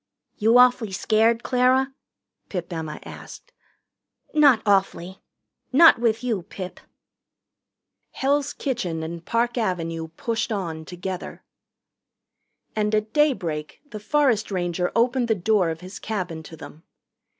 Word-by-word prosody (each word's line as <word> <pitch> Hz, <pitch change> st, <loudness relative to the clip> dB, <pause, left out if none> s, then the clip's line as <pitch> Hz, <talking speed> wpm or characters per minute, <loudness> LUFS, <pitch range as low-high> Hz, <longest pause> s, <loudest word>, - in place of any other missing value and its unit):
"You 225 Hz, +3 st, +4 dB
awfully 245 Hz, -5 st, +4 dB
scared, 225 Hz, +4 st, +2 dB
Clara?" 260 Hz, +1 st, +2 dB, 0.6 s
Pip 180 Hz, -2 st, -5 dB
Emma 155 Hz, -2 st, -5 dB
asked. -, -, -11 dB, 0.8 s
"Not 290 Hz, -6 st, +5 dB
awfully 195 Hz, -2 st, 0 dB, 0.5 s
not 320 Hz, 0 st, +7 dB
with 230 Hz, -1 st, +1 dB
you, 225 Hz, -6 st, -1 dB
Pip." 185 Hz, +1 st, -8 dB, 1.3 s
Hell's 280 Hz, +1 st, 0 dB
Kitchen 190 Hz, -, -3 dB
and 165 Hz, +1 st, -6 dB
Park 235 Hz, +4 st, 0 dB
Avenue 165 Hz, -6 st, -2 dB
pushed 225 Hz, +8 st, -3 dB
on 165 Hz, -6 st, -4 dB
together. 180 Hz, +2 st, -6 dB, 1.3 s
And 210 Hz, 0 st, +1 dB
at 215 Hz, +1 st, -2 dB
daybreak 175 Hz, -, 0 dB
the 215 Hz, -, -6 dB
forest 245 Hz, -2 st, +1 dB
ranger 180 Hz, -2 st, -1 dB
opened 245 Hz, +1 st, +2 dB
the 220 Hz, -, +2 dB
door 195 Hz, -2 st, +2 dB
of 160 Hz, +1 st, -5 dB
his 185 Hz, +2 st, -9 dB
cabin 180 Hz, -7 st, -4 dB
to 160 Hz, +1 st, -12 dB
them. 155 Hz, -, -12 dB
210 Hz, 120 wpm, -24 LUFS, 175-240 Hz, 1.3 s, not